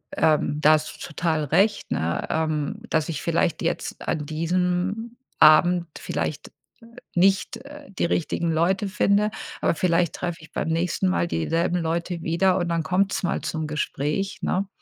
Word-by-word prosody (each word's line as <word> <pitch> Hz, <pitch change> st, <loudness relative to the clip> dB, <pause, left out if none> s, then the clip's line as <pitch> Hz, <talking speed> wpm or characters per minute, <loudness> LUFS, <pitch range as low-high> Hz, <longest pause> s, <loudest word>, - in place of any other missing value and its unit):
ähm 150 Hz, -1 st, +2 dB
da 155 Hz, +1 st, +7 dB
hast 155 Hz, 0 st, -1 dB
du -, -, -5 dB
total 160 Hz, -2 st, -1 dB
recht, 195 Hz, +9 st, +1 dB
ne, 80 Hz, +1 st, -1 dB
ähm, 155 Hz, +3 st, -1 dB
dass 160 Hz, 0 st, 0 dB
ich 150 Hz, -6 st, -3 dB
vielleicht -, -, 0 dB
jetzt -, -, -3 dB
an 150 Hz, -, -1 dB
diesem 180 Hz, +8 st, -1 dB, 0.2 s
Abend 170 Hz, +3 st, +6 dB
vielleicht, -, -, -3 dB
äh, -, -, -40 dB, 0.6 s
nicht, 195 Hz, +2 st, +2 dB
äh, 295 Hz, +1 st, -12 dB
die 190 Hz, -, -1 dB
richtigen 170 Hz, 0 st, 0 dB
Leute 185 Hz, +5 st, +1 dB
finde, 205 Hz, +2 st, +2 dB, 0.3 s
aber -, -, +2 dB
vielleicht 170 Hz, 0 st, +1 dB
treffe 175 Hz, -1 st, -4 dB
ich 160 Hz, -, -15 dB
beim -, -, -2 dB
nächsten 165 Hz, -, 0 dB
Mal 85 Hz, -1 st, +1 dB
dieselben 165 Hz, -, 0 dB
Leute 170 Hz, +1 st, -2 dB
wieder 180 Hz, +3 st, +2 dB
und 175 Hz, -1 st, -1 dB
dann 165 Hz, -1 st, 0 dB
kommt 190 Hz, +3 st, +1 dB
es -, -, -2 dB
mal 175 Hz, -, -1 dB
zum 160 Hz, -1 st, -3 dB
Gespräch, 150 Hz, +5 st, -2 dB
ne? 190 Hz, +2 st, 0 dB
170 Hz, 165 wpm, -24 LUFS, 155-185 Hz, 0.6 s, da